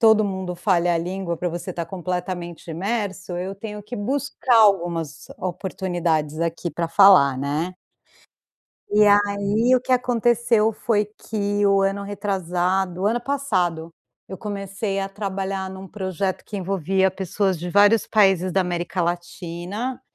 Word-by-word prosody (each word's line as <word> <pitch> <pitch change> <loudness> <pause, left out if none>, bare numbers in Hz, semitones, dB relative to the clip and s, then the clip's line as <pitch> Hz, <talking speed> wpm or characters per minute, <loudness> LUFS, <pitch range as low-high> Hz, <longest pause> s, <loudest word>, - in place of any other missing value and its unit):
todo 220 -2 +6
mundo 190 -2 -3
fale 175 -2 +2
a 170 -1 +2
língua 180 0 -3
para 175 +2 -2
você 175 +3 -5
estar 170 -1 -4
completamente 180 -1 -5
imerso, 195 0 -3
eu 185 +2 -4
tenho 210 +1 -7
que 210 +4 -8
buscar 260 +2 0
algumas 175 -8 +2
oportunidades 175 -4 -2
aqui 170 +1 -2
para 170 -1 -3
falar, 165 -8 +6
né. 150 +6 -2 1.2
E 210 +1 +5
aí, 205 +4 +3
o - - 0
que 255 - -1
aconteceu 235 -2 +2
foi 210 0 0 0.2
que 205 -1 0
o 195 0 +4
ano 195 +1 0
retrasado, 190 -2 -1
o - - +2
ano 235 +3 +1
passado, 185 -13 -1 0.4
eu 190 - -7
comecei 200 -1 -4
a 195 - -3
trabalhar 195 -1 -3
num 190 0 -9
projeto 190 -1 -3
que 210 - -6
envolvia 190 0 +1
pessoas 190 0 -1
de 175 - -5
vários 205 +3 +5
países 195 -4 +3
da 195 - +3
América 175 0 -2
Latina, 175 +7 -4
190 Hz, 145 wpm, -23 LUFS, 175-205 Hz, 1.2 s, todo